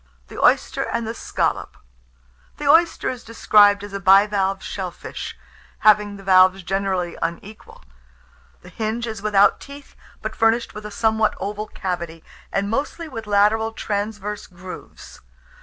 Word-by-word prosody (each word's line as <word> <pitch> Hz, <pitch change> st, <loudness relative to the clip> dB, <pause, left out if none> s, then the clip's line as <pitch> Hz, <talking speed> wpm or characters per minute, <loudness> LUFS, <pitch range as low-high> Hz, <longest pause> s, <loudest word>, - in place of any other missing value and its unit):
THE -, -, -7 dB
OYSTER -, -, +3 dB
AND 230 Hz, -, -2 dB
THE 225 Hz, -, -3 dB
SCALLOP. -, -, -2 dB, 0.8 s
The 295 Hz, -, -4 dB
oyster 330 Hz, +4 st, +4 dB
is 255 Hz, -2 st, -4 dB
described 205 Hz, -3 st, +4 dB
as 205 Hz, -1 st, -9 dB
a 200 Hz, -, -3 dB
bivalve 195 Hz, 0 st, +3 dB
shell 190 Hz, -2 st, -4 dB
fish, -, -, -8 dB, 0.4 s
having 210 Hz, -1 st, +3 dB
the 195 Hz, -, -12 dB
valves 185 Hz, 0 st, +5 dB
generally 190 Hz, -1 st, -2 dB
unequal. 180 Hz, +6 st, -6 dB, 0.8 s
The 180 Hz, -, -12 dB
hinge 220 Hz, +5 st, -3 dB
is 220 Hz, -3 st, -6 dB
without 205 Hz, -1 st, +4 dB
teeth, 280 Hz, 0 st, -12 dB, 0.3 s
but -, -, -4 dB
furnished 225 Hz, +1 st, +1 dB
with 210 Hz, 0 st, -7 dB
a -, -, -8 dB
somewhat 220 Hz, 0 st, +1 dB
oval 210 Hz, +2 st, -4 dB
cavity, 170 Hz, -5 st, -5 dB, 0.3 s
and 200 Hz, +1 st, -1 dB
mostly 285 Hz, +9 st, -3 dB
with 225 Hz, -7 st, -8 dB
lateral 210 Hz, +2 st, +2 dB
transverse 210 Hz, -1 st, -4 dB
grooves. 180 Hz, +1 st, -11 dB
205 Hz, 140 wpm, -22 LUFS, 195-220 Hz, 0.8 s, valves